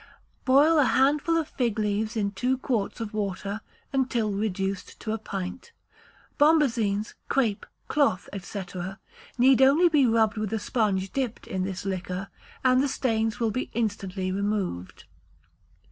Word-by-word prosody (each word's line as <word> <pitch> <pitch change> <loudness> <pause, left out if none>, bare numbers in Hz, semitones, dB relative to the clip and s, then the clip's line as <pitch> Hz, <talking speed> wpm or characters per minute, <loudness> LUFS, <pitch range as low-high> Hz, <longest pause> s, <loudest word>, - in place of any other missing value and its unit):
Boil 295 +5 +5
a - - +6
handful 290 +6 +3
of 320 -2 0
fig 235 -4 -1
leaves 215 +1 -1
in 200 -2 0
two 250 +6 0
quarts 240 -6 -2
of 225 -1 -5
water 200 0 -3 0.3
until 250 -5 +1
reduced 195 -2 -3
to 220 - -4
a 220 - -3
pint. 200 - -6 0.7
Bombazines, 235 -9 +3 0.2
crape, 230 -7 0 0.2
cloth, 280 -11 +1
&c., 195 +2 -5 0.7
need 260 +1 +5
only 295 +7 +6
be 290 -5 +4
rubbed 225 -1 +2
with 215 -2 -2
a - - +1
sponge 205 -4 0
dipped 255 -4 -2
in 190 - -3
this 190 0 -5
liquor, 185 0 -3 0.3
and 255 0 +4
the 280 - +2
stains 225 -4 0
will 230 -2 +1
be 255 +5 -3
instantly 195 -4 -2
removed. 195 - -3
220 Hz, 145 wpm, -26 LUFS, 200-260 Hz, 0.7 s, a